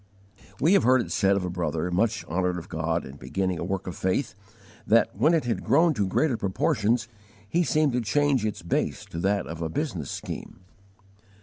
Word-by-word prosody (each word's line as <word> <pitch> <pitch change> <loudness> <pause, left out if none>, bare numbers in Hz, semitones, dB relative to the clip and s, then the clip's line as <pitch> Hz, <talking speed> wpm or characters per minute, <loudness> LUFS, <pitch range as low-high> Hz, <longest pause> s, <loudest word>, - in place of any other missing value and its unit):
We 165 +8 +4
have 200 - +5
heard 130 0 +4
it - - -6
said 100 -1 +3
of 95 - -2
a - - -2
brother, 85 -1 -2
much 110 +6 0
honoured 90 +1 -1
of 85 - -8
God 80 +2 -1
in 70 +2 -10
beginning 95 +1 -2
a - - -3
work 95 +1 -3
of 90 - -5
faith, 95 +4 -1 0.5
that, 115 +2 +3
when 165 +2 +4
it 160 - +1
had 120 - -2
grown 165 +3 +4
to 105 -7 0
greater 130 +5 +1
proportions, 110 +4 0 0.4
he 170 +11 +1
seemed 155 -4 +2
to 125 - +1
change 135 +2 +2
its 105 -5 -3
base 85 - -1
to 80 - -4
that 100 +2 +1
of 85 0 -7
a 80 - -2
business 90 - -3
scheme. - - -7
100 Hz, 200 wpm, -26 LUFS, 90-125 Hz, 0.5 s, have